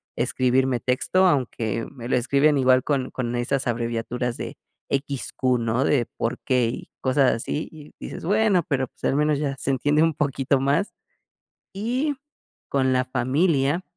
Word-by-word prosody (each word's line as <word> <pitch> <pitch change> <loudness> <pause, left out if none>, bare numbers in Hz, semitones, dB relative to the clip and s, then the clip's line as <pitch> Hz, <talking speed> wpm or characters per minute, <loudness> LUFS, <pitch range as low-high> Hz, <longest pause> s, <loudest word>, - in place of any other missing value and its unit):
escribirme 130 0 +1
texto 130 +10 +2
aunque 115 - 0
me 120 -3 -8
lo - - +2
escriben 140 +4 +3
igual 130 -1 +4
con 135 -3 -1
con 120 -1 -3
esas 125 +3 -1
abreviaturas 120 +1 -2
de - - -6 0.3
equis, 140 -1 -2
cu, 130 -1 +1
¿no? 115 +2 0
De, 130 -5 +2
por 115 - -2
qué, 125 -3 +1
y 120 - -7
cosas 130 0 +3
así 130 +6 -3
y 150 -2 -13
dices - - -7
bueno, 205 -1 +3
pero, 135 -4 0
pues, - - -29
al - - +2
menos 150 0 +2
ya 140 -2 -1
se - - -3
entiende 145 +3 +2
un 165 -2 +1
poquito 140 -2 0
más. 140 +9 +1 0.8
Y 255 +8 -1 0.5
con 130 -1 +1
la 130 0 +1
familia 140 +5 +1
135 Hz, 165 wpm, -24 LUFS, 125-150 Hz, 0.8 s, igual